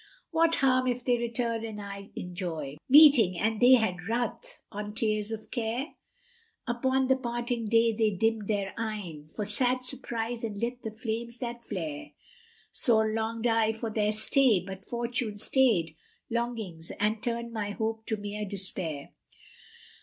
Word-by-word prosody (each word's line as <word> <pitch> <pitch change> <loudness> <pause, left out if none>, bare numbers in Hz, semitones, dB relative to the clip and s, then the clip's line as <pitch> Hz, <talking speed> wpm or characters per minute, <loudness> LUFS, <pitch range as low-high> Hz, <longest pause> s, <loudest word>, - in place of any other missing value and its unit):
What 330 0 +3
harm 255 -1 +3
if 245 -1 -1
they 245 -2 +2
return 235 -1 -2
and 220 -2 -6
I 200 0 -8
enjoy 170 -6 -5
* - - -49
Meeting, 265 - +8
and 220 +4 0
they 250 +1 +8
had 185 -7 0
ruth 245 - -3
on 210 0 -6
tears 215 -2 0
of 220 -1 -6
care? 240 +4 -2 0.7
Upon 260 +2 +1
the 265 - +4
parting 240 -2 -2
day 230 +1 +4
they 220 0 +2
dimmed 215 +1 0
these 200 -2 0
eyne, 195 -9 -5
* 155 - -20
For 210 - -2
sad 250 +4 +2
surprise, 240 -2 -3
and 210 -3 -4
lit 240 +2 -3
the 220 - -4
flames 230 +1 -4
that 240 -1 -5
flare. 165 -9 -5 0.6
Sore 220 -4 +3
longed 225 +1 -2
I 225 -1 +3
for 225 0 -4
their 210 -1 +1
stay, 220 +1 +4
but 190 +1 -9
Fortune 235 -2 -2
stayed 210 - +2 0.2
* - - -41
Longings 225 -9 -3
and 210 +1 +1
turned 235 -1 -3
my 210 -2 -2
hope 220 +1 -3
to 220 - 0
mere 205 +1 -5
despair. 185 -7 -3
225 Hz, 160 wpm, -29 LUFS, 205-240 Hz, 0.7 s, Meeting